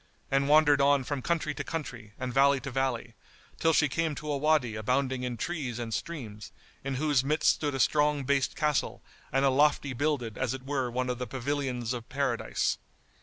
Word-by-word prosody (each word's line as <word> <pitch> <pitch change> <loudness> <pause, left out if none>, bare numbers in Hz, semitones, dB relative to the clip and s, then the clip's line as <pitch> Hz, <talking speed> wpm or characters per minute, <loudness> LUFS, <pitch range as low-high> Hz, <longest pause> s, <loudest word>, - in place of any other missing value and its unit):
and 135 +1 +2
wandered 145 -2 +5
on 140 -1 +4
from 140 +1 -3
country 155 0 -1
to - - -4
country, 125 -10 -6
and 130 -1 -3
valley 140 +1 +4
to 135 +1 -6
valley, 125 -3 -1 0.5
till 165 - +3
she 150 -1 +4
came 155 +2 -1
to 150 0 -5
a - - 0
Wady 145 -5 +2
abounding 130 +4 0
in 125 -1 -3
trees 135 -4 -3
and 115 -2 -4
streams, 110 - -6 0.3
in 135 0 -2
whose 145 -1 +2
midst 150 +3 +3
stood 145 -3 -2
a - - -3
strong 150 0 +2
based 140 0 +1
castle 150 -3 0 0.3
and 135 +1 +2
a 135 - +4
lofty 145 0 +2
builded 130 -5 -1
as 130 -1 0
it 130 0 -10
were 135 -3 -1
one 125 +1 -2
of 125 -1 -2
the 125 - -3
pavilions 130 -2 -2
of 120 -2 -7
Paradise. 135 -4 -1
135 Hz, 195 wpm, -29 LUFS, 125-145 Hz, 0.5 s, wandered